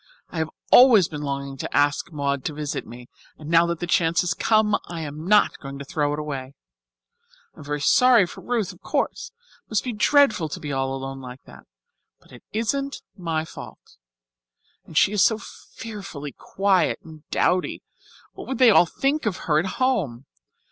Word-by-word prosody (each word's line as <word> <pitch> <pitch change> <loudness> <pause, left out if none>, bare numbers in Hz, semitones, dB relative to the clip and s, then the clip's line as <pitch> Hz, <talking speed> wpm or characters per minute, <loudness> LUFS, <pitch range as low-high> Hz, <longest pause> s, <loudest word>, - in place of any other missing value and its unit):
I 165 - -4
have 160 0 -1 0.2
always 235 -8 +8
been 150 -2 -7
longing 140 -1 -4
to - - -3
ask 145 +3 +1
Maud 140 -3 -2
to 155 - -3
visit 150 -1 -4
me, 120 +1 -11 0.3
and 155 -1 -10
now 170 0 +5
that 170 -1 -2
the - - -3
chance 170 -1 +2
has 180 0 0
come 215 +2 +2
I 170 -1 -6
am 155 +2 -7
not 210 +1 +4
going 140 0 -8
to 140 - -8
throw 145 +1 -1
it 145 - -2
away. 140 -3 -5 1.0
I - - -18
am - - -9
very 145 0 -3
sorry 245 - +5
for - - -11
Ruth, 235 -5 -2
of - - -20
course. - - -2 0.3
It - - -48
must 215 -3 0
be 250 - -3
dreadful 220 - +3
to - - -6
be 145 -2 -5
all 135 0 -1
alone 135 0 -6
like 125 0 -10
that. - - -15 0.5
But - - -24
it - - -13
isn't 275 +6 -2
my 165 -4 -2
fault. - - -12 0.9
And 160 - -7
she 195 - +5
is 210 -2 +3
so 220 - +3
fearfully 195 -10 -9
quiet 195 0 +1
and 160 -1 -13
dowdy 180 0 0 0.5
what - - -10
would 265 - -3
they 255 -3 +7
all 175 - +6
think 275 - -1
of 190 -3 -1
her 155 -2 +3
at 175 - -1
home? 180 - 0
165 Hz, 190 wpm, -23 LUFS, 145-210 Hz, 1.0 s, always